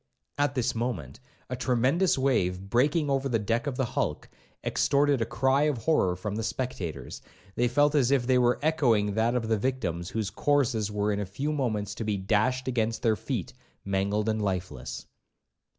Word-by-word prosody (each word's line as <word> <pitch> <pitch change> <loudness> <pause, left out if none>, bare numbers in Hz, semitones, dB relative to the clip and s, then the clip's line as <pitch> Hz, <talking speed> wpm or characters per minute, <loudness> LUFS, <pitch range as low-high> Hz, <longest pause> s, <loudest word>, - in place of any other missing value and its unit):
At 145 -1 +1
this 125 -1 0
moment, 120 +2 -4 0.3
a 125 - -3
tremendous 130 +9 +2
wave 105 -10 +1
breaking 145 +5 +2
over 135 0 0
the 120 - +2
deck 115 +6 -1
of 130 -3 -3
the 135 - +1
hulk, - - -2 0.3
extorted 140 -2 +2
a 115 - 0
cry 135 +2 +2
of 145 - -1
horror 110 - +2
from 100 +3 -4
the - - -1
spectators; 90 - -4 0.3
they 120 +3 +1
felt 145 +4 +3
as 135 -5 +3
if 135 -3 +2
they 130 0 +3
were 120 0 +3
echoing 120 -10 +2
that 115 +3 +1
of 115 -3 -1
the 110 -2 +1
victims 100 -9 -2
whose 110 -3 -2
corses 120 -4 +1
were 105 0 0
in 100 - -1
a 105 - -2
few 135 +11 -3
moments 115 -8 -1
to - - -5
be 105 -2 -1
dashed 110 +7 +1
against 115 -3 -1
their 110 -2 +3
feet, - - -4 0.3
mangled 100 +2 0
and 110 -1 0
lifeless. 95 -2 -4
120 Hz, 185 wpm, -28 LUFS, 105-135 Hz, 0.3 s, felt